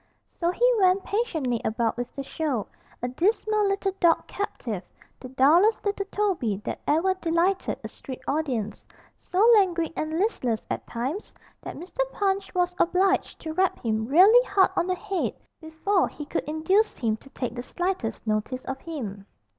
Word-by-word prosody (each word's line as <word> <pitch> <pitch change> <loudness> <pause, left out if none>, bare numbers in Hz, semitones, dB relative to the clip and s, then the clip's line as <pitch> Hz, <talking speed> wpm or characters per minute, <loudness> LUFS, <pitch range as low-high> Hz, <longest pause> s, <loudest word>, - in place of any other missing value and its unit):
So 340 - -2
he 475 +8 +3
went 375 0 +4
patiently 320 - -1
about 225 +1 0
with 245 0 -4
the 275 - -4
show, 275 -7 -2 0.4
a - - +1
dismal 420 - +1
little 395 0 0
dog 340 -2 +4
captive, 250 - -4 0.4
the 255 - -9
dullest 325 - +4
little 400 -1 -1
Toby 365 - 0
that - - -4
ever 330 +6 +3
delighted 365 +1 0
a - - -4
street 260 -2 -9
audience; 260 -8 -2 0.4
so 390 +5 +2
languid 350 -6 +3
and 315 +1 -2
listless 255 - 0
at - - -4
times 265 - -4 0.3
that - - -7
Mr. 365 +8 -11
Punch 390 -1 0
was 360 0 +1
obliged 375 +2 +2
to 315 -1 -5
rap 375 +2 +1
him 220 0 0
really 390 - +7
hard 390 -2 +4
on 345 - +1
the 370 - +1
head 395 -1 -2 0.3
before 330 +5 +1
he 295 - -8
could 300 - -3
induce 370 +8 +1
him 225 -4 0
to 270 - -17
take 250 -3 -4
the 245 - -5
slightest 350 - -3
notice 215 +4 -2
of 265 0 -4
him. 210 -12 -6
335 Hz, 165 wpm, -26 LUFS, 255-390 Hz, 0.4 s, really